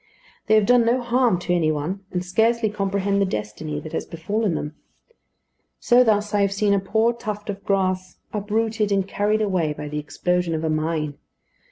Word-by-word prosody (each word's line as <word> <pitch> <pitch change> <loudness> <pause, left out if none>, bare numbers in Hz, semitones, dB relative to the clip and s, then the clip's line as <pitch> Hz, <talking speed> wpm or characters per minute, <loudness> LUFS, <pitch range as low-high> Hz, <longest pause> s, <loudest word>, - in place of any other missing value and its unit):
They 220 - +5
have 215 -2 +4
done 245 +2 +5
no 235 +3 +2
harm 240 -4 +2
to 175 - -1
any 160 -3 +2
one, 160 +7 -3
and 180 0 -3
scarcely 225 +3 +2
comprehend 200 -1 0
the - - +4
destiny 145 +5 -4
that 155 - -9
has - - -1
befallen 190 +3 -1
them. 150 0 -4 1.1
So 245 0 +5
thus 210 -2 +1
I 205 - +3
have 200 -1 +2
seen 200 0 +2
a 200 - +3
poor 220 +4 +1
tuft 210 -3 -5
of 200 0 -9
grass 185 -2 -1 0.2
uprooted 215 +1 -1
and 195 -1 +1
carried 210 +2 +1
away 180 -7 0
by 150 0 -7
the 150 0 -3
explosion 175 +3 -1
of 160 - -3
a 160 - 0
mine. 155 -2 -2
200 Hz, 190 wpm, -23 LUFS, 165-215 Hz, 1.1 s, They